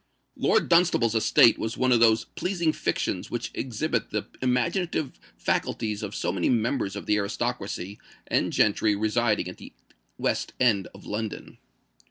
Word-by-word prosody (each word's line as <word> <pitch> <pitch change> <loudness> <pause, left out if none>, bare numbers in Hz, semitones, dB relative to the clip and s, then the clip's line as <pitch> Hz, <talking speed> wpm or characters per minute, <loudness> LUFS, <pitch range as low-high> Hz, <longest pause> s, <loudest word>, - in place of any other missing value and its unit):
Lord - - +2
Dunstable's 170 -10 +3
estate 115 0 +5
was 110 +1 -3
one 130 0 +2
of 120 - +5
those 115 -1 +4
pleasing 170 -4 -1
fictions - - -2
which - - -4
exhibit 125 -1 -2
the 105 -1 -2 0.2
imaginative 130 +5 -1 0.2
faculties 105 -2 -1
of 105 -1 -5
so - - -1
many 95 -3 0
members 115 -3 0
of 100 - -6
the 105 - +2
aristocracy 100 -2 -3 0.3
and - - 0
gentry 105 0 +2
residing 110 +1 +1
at 90 - -8
the - - -12 0.4
West - - -1
End 110 -7 +3
of 100 - -14
London. 105 0 -5
115 Hz, 150 wpm, -26 LUFS, 105-125 Hz, 0.4 s, estate